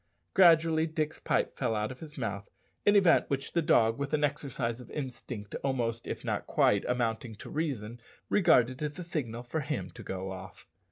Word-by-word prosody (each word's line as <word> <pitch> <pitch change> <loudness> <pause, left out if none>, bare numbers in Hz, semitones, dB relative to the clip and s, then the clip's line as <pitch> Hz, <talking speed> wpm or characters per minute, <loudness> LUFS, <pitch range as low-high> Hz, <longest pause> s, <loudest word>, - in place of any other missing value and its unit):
Gradually 165 -3 +5
Dick's 155 -1 -2
pipe - - 0
fell 115 - 0
out 105 +3 -1
of 130 - -10
his 150 -2 -10
mouth, 100 -5 -4 0.4
an 205 - +6
event 185 -4 +5
which 135 0 -2
the 170 - +3
dog, 115 -5 +3
with 140 +2 0
an 150 - -1
exercise 135 -5 -1
of 125 - -13
instinct 125 -6 -6
almost, 120 -4 -1
if - - -5
not - - -2
quite, 100 -1 +3
amounting 115 -2 -1
to - - -10
reason, 120 -7 -3 0.3
regarded 130 - +4
as 150 -1 -3
a 180 - -5
signal 125 -9 -4
for 125 +6 -3
him 150 0 -3
to 115 - -11
go 95 -2 -5
off. 95 0 -9
130 Hz, 185 wpm, -30 LUFS, 115-155 Hz, 0.4 s, an